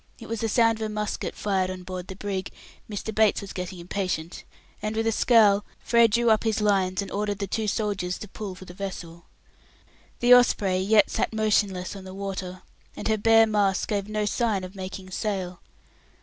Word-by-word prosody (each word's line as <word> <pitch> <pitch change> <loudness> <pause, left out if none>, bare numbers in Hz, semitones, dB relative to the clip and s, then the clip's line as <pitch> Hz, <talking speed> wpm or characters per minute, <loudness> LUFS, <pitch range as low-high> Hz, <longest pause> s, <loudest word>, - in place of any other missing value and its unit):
It - - -11
was 230 -1 -3
the 225 - 0
sound 225 0 +3
of - - 0
a - - -6
musket 210 0 -3
fired 190 -3 0
on 185 -1 -6
board 185 0 -6
the 190 - -7
brig: 195 -1 -4 0.4
Mr. 215 +1 -4
Bates 215 -1 +3
was 200 - -8
getting 180 0 -5
impatient; 175 -2 -4 0.4
and 215 +1 -3
with 225 0 0
a 225 - +2
scowl, 210 -3 +4
Frere 235 -1 +4
drew 235 +1 +2
up 215 - +3
his 220 -1 0
lines, 195 -2 +1
and - - -9
ordered 205 0 -2
the 200 - -2
two 215 +3 -2
soldiers 200 -4 -1
to 210 - -8
pull 195 -1 -7
for 185 - -12
the 175 - -11
vessel. 175 -3 -7 0.9
The 245 +1 +6
Osprey 205 -6 +4
yet 210 +3 +4
sat - - -1
motionless 205 -4 +1
on 195 - -9
the 190 0 -9
water, 190 -2 -5 0.3
and - - -4
her 220 - +2
bare 225 +1 +6
masts 205 -3 +1
gave 205 -1 -2
no 215 0 -1
sign 210 -2 0
of 185 0 -8
making 190 -1 -7
sail. 185 -3 -3
200 Hz, 200 wpm, -26 LUFS, 185-215 Hz, 0.9 s, The